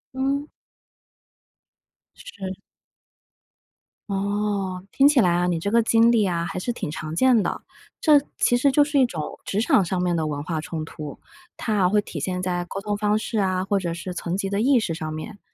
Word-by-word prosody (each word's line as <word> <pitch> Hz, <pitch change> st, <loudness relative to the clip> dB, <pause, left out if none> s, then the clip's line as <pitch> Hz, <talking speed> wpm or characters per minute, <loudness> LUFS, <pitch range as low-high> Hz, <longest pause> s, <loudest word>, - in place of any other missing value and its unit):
嗯。 275 Hz, +2 st, -1 dB, 1.7 s
是。 190 Hz, -, -7 dB, 1.5 s
哦， 200 Hz, -2 st, -2 dB
听 275 Hz, -, +5 dB
起 295 Hz, -, +4 dB
来 180 Hz, -6 st, +4 dB
啊， 175 Hz, +1 st, +1 dB
你 175 Hz, -1 st, 0 dB
这 200 Hz, +4 st, -2 dB
个 235 Hz, +1 st, +5 dB
经 230 Hz, +1 st, +4 dB
历 220 Hz, -4 st, +3 dB
啊 170 Hz, -2 st, -1 dB
还 180 Hz, -, -4 dB
是 240 Hz, -, -2 dB
挺 230 Hz, -, -4 dB
常 155 Hz, 0 st, -5 dB
见 250 Hz, +3 st, +4 dB
的。 -, -, -3 dB, 0.4 s
这 300 Hz, -3 st, +6 dB, 0.2 s
其 245 Hz, -, +3 dB
实 275 Hz, +3 st, +3 dB
就 290 Hz, +2 st, +5 dB
是 290 Hz, -1 st, +1 dB
一 260 Hz, -, +6 dB
种 160 Hz, -9 st, -6 dB
职 200 Hz, -, -1 dB
场 220 Hz, -3 st, +4 dB
上 180 Hz, +1 st, -2 dB
面 180 Hz, -1 st, +1 dB
的 160 Hz, -2 st, 0 dB
文 145 Hz, -1 st, -3 dB
化 160 Hz, 0 st, -3 dB
冲 160 Hz, 0 st, -5 dB
突， 150 Hz, -3 st, -8 dB, 0.4 s
它 220 Hz, -, -2 dB
啊 185 Hz, -3 st, +3 dB
会 210 Hz, +2 st, +3 dB
体 165 Hz, -, -6 dB
现 180 Hz, +5 st, -2 dB
在 175 Hz, -1 st, -1 dB
沟 195 Hz, -, -5 dB
通 205 Hz, 0 st, -2 dB
方 210 Hz, 0 st, +1 dB
式 220 Hz, 0 st, -2 dB
啊， 185 Hz, -1 st, 0 dB
或 200 Hz, 0 st, +1 dB
者 170 Hz, -3 st, -3 dB
是 180 Hz, +1 st, -6 dB
层 180 Hz, +1 st, -3 dB
级 195 Hz, -, -2 dB
的 200 Hz, +1 st, -1 dB
意 260 Hz, +1 st, +4 dB
识 190 Hz, -7 st, -2 dB
上 160 Hz, -1 st, -5 dB
面。 200 Hz, +7 st, -7 dB
195 Hz, 215 characters per minute, -24 LUFS, 175-225 Hz, 1.7 s, 这